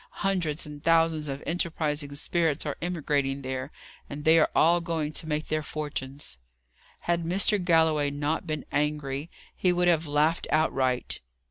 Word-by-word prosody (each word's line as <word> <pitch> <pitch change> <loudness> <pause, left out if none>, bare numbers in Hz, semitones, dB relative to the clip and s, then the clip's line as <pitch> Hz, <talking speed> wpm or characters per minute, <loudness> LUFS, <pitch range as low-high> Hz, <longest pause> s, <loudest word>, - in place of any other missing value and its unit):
Hundreds 170 -6 0
and 150 0 -10
thousands 165 -2 +3
of 135 +1 -5
enterprising 155 -4 -2
spirits 160 0 0
are 145 - -2
emigrating 145 -5 -1
there, 130 +2 -4 0.4
and 145 +1 -7
they 160 +1 +6
are 155 - +4
all 170 +2 +4
going 160 -3 -2
to 160 - -5
make 150 0 -2
their 155 0 0
fortunes." 145 - -5 0.6
Had 170 0 0
Mr. 190 +3 +2
Galloway 160 -4 +3
not 145 +4 -2
been 155 -2 -3
angry, 150 0 -1 0.3
he 180 - +2
would 175 0 +2
have 165 -2 +3
laughed 150 +3 +1
out 155 +1 +2
right. 130 -2 -1
155 Hz, 155 wpm, -27 LUFS, 145-165 Hz, 0.6 s, they